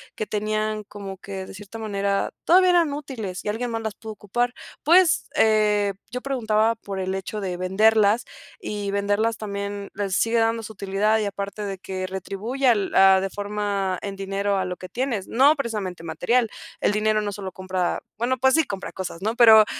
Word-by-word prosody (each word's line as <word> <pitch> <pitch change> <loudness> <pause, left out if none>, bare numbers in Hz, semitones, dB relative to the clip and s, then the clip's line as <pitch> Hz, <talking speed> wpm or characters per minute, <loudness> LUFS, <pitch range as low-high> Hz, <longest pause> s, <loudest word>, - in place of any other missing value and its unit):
que 215 - -3
tenían 215 0 -1
como 200 -1 -8
que, 190 0 -7
de - - -10
cierta 205 +3 -9
manera, 200 -2 -1 0.2
todavía 365 +2 +6
eran 340 -5 +3
útiles 240 -11 -5
y - - -2
alguien 235 +3 -2
más 225 0 -2
las 220 -2 -4
pudo 220 - -8
ocupar. 240 +4 -1 0.3
Pues, 340 +2 +4
eh, 210 -4 +3 0.2
yo 250 +1 -4
preguntaba 225 -4 +1
por 200 -3 -6
el 190 0 -2
hecho 195 +2 -4
de 185 -2 -3
venderlas 210 +4 +3 0.3
y 205 - -4
venderlas 205 +3 +1
también 200 -1 -5
les 195 -2 -1
sigue 230 +3 +2
dando 225 0 +2
su 220 0 -8
utilidad 200 +2 +1
y 215 - 0
aparte 200 +1 -4
de 195 -2 -5
que 185 0 -4
retribuye 200 +8 -3
al 210 -5 +2
ah, 190 0 +7
de 195 0 -3
forma 205 -2 -2
en 200 -1 -4
dinero 195 0 -1
a 185 - -1
lo 180 -1 -4
que 185 - -9
tienes, 240 -6 -2
no 275 +5 +5
precisamente 210 - -4
material. 195 +9 +1 0.3
El - - +3
dinero 215 +1 +2
no 205 - -2
solo 195 -2 -6
compra 185 -1 -2 0.2
bueno, 250 +3 +1
pues 265 +1 +3
sí 320 - +5
compra 195 -5 -5
cosas, 185 -1 -6
¿no?, 220 +2 0
pero 220 -3 +8
210 Hz, 190 wpm, -24 LUFS, 195-225 Hz, 0.3 s, pero